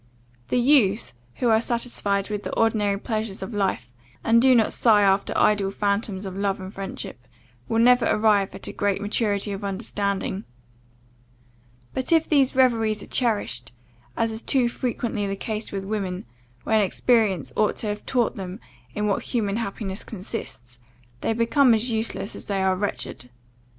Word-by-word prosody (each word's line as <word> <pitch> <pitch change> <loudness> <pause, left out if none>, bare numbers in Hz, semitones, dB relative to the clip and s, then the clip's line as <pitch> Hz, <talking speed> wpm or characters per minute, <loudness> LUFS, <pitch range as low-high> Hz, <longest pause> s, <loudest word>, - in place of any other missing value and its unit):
The - - 0
youths 235 - +3 0.2
who 245 - +1
are 220 0 +4
satisfied 220 -4 -1
with 205 -1 -2
the - - -5
ordinary 210 -3 +2
pleasures 215 -2 -3
of 220 - -6
life, 190 - -1 0.3
and 230 +1 +4
do 260 0 +6
not 225 -2 +3
sigh 215 -3 +4
after 195 0 +2
ideal 205 -2 +3
phantoms 200 0 -1
of 190 -1 -6
love 195 0 -1
and 190 +1 -8
friendship, 190 -10 -7 0.4
will 225 - +1
never 245 +2 +5
arrive 210 -2 +2
at - - -6
great 200 -1 +1
maturity 205 0 0
of 200 +1 -5
understanding; 200 -1 -2 1.5
but 260 +3 -2
if 325 -1 +4
these 275 -3 +3
reveries 225 -5 +2
are - - -13
cherished, 205 - 0 0.4
as 225 0 +1
is 220 +1 -6
too 255 -1 +2
frequently 235 -4 -2
the 195 - -2
case 215 +2 -4
with 195 -1 -4
women, 195 -3 -3 0.4
when 220 -1 +3
experience 195 - +1
ought 215 - +2
to - - -2
have 210 0 -3
taught 245 -4 0
them 190 +1 -6 0.4
in 210 - -1
what 200 -2 +1
human 215 -4 -1
happiness 200 -3 -4
consists, 180 - -8 0.4
they - - 0
become 235 +2 +4
as 230 +3 +1
useless 220 -2 -2
as - - -9
they 195 -2 0
are 190 0 +2
wretched. 185 -9 -4
210 Hz, 160 wpm, -24 LUFS, 195-230 Hz, 1.5 s, do